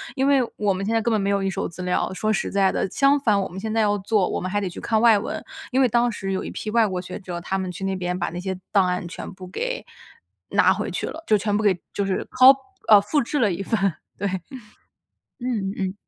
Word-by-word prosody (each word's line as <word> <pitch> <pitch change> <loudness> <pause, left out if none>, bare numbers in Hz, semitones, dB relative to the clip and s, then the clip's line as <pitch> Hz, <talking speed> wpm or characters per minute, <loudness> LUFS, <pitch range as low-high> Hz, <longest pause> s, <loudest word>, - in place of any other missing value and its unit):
因 270 0 +1
为 280 -2 +5 0.2
我 205 -2 +1
们 195 +1 -3
现 220 - -1
在 225 - +2
根 235 - 0
本 215 - +2
没 195 - 0
有 200 0 +1
一 195 - 0
手 190 - -3
资 170 +2 -9
料， 180 +1 0
说 215 +3 0
实 - - -1
在 195 -1 +2
的， - - -1
相 280 +5 +3
反， 215 -7 +2
我 190 - -2
们 180 - -10
现 220 +3 -3
在 225 - +1
要 205 -1 +2
做， 195 -1 +1
我 - - -2
们 185 +1 -3
还 205 - +1
得 195 - -2
去 175 - -9
看 220 -1 +1
外 225 -2 +6
文。 200 - -4 0.3
因 260 - +2
为 260 - +5
当 240 +1 +2
时 195 -3 -4
有 190 - -2
一 - - -6
批 215 - -5
外 230 0 +4
国 185 -3 -2
学 180 0 -7
者， 180 -2 -5
他 190 +3 -2
们 185 -1 -3
去 185 +2 -6
那 195 0 -1
边 180 0 -3
把 175 - -1
那 175 - -5
些 190 0 -4
档 195 -2 +5
案 180 -1 -2
全 170 - -7
部 185 -1 -10
给 - - -4 0.6
拿 - - +4
回 - - -3
去 - - -3
了， 325 +1 -7
就 215 - +4
全 205 0 -1
部 210 - 0
给 190 -4 +3
就 200 - -1
是 190 -1 -1
Co 255 +1 +8 0.4
哦， 210 -2 +9
复 245 +9 0
制 295 +5 -2
了 210 -7 +2
一 195 - -4
份 225 +1 0 0.4
对， 200 - -1 1.1
嗯 220 -6 -2
嗯。 190 -1 -2
200 Hz, 295 characters per minute, -23 LUFS, 190-225 Hz, 1.1 s, 哦